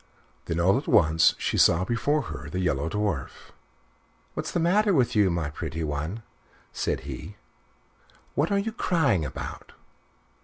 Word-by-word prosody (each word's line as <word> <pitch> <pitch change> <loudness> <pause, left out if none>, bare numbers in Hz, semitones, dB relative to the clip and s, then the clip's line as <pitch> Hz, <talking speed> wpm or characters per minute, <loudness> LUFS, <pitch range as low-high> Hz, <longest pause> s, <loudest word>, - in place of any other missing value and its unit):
Then 85 - -2
all 95 +8 +4
at 140 - -11
once 80 -3 +4
she - - -1
saw 85 +2 +5
before 140 +7 0
her 80 - -7
the 90 - -3
Yellow 80 -4 0
Dwarf. 100 -8 -3 0.8
"What's - - -4
the - - -1
matter 195 +4 +3
with 125 -5 +2
you, 105 -3 +4
my 85 -3 -2
pretty 80 +1 -4
one?" 80 +9 -3 0.5
said - - -1
he. - - -8 1.0
"What 150 +6 0
are 200 - +3
you 205 +3 -1
crying 150 - +1
about?" 70 -3 -7
95 Hz, 150 wpm, -26 LUFS, -, 1.0 s, saw